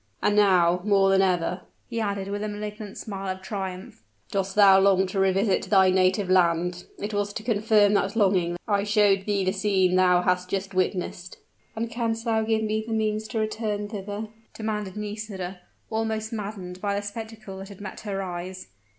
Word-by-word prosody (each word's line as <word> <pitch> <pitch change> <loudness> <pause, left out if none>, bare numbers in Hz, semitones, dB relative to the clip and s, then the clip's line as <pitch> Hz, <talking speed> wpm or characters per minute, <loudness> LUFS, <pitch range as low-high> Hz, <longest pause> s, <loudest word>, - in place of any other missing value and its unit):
"And 205 - +3
now, 180 -4 +4
more 195 -1 +4
than 195 0 +5
ever," 180 -1 0 0.3
he 230 -1 -3
added 200 -2 -2
with 205 0 -3
a 215 - -2
malignant 210 0 -6
smile 195 -2 -5
of 190 - -16
triumph, 190 - -6 0.3
"dost 195 -1 -1
thou 195 -2 +7
long 190 -1 +4
to 190 +1 -3
revisit 195 +1 +2
thy 190 -2 +5
native 185 +1 +2
land. 180 -1 +2
It 210 +1 -5
was 205 0 -1
to 215 - -5
confirm 215 -2 +3
that 200 0 +1
longing 190 -5 +2
that 175 - -6
I 200 -2 +2
showed 205 -2 +3
thee 200 -2 +1
the 185 - +2
scene 190 -2 +2
thou 180 -1 +4
hast 180 0 +1
just 195 0 -3
witnessed." 185 -1 -2 0.4
"And 225 +1 -2
canst 230 -1 -2
thou 225 -1 +2
give 220 0 0
me 215 0 -1
the 225 - -2
means 215 0 -1
to 225 - -5
return 215 -1 -2
thither?" 205 +1 -5 0.3
demanded 210 -3 -3
Nisida, 205 -3 -5 0.3
almost 220 0 -2
maddened 195 -4 -6
by 200 -1 0
the 205 - -2
spectacle 215 -2 -7
that 195 +1 -8
had 200 - -12
met 200 -2 -7
her 195 -2 -3
eyes. 180 - -6
200 Hz, 185 wpm, -25 LUFS, 185-215 Hz, 0.4 s, thou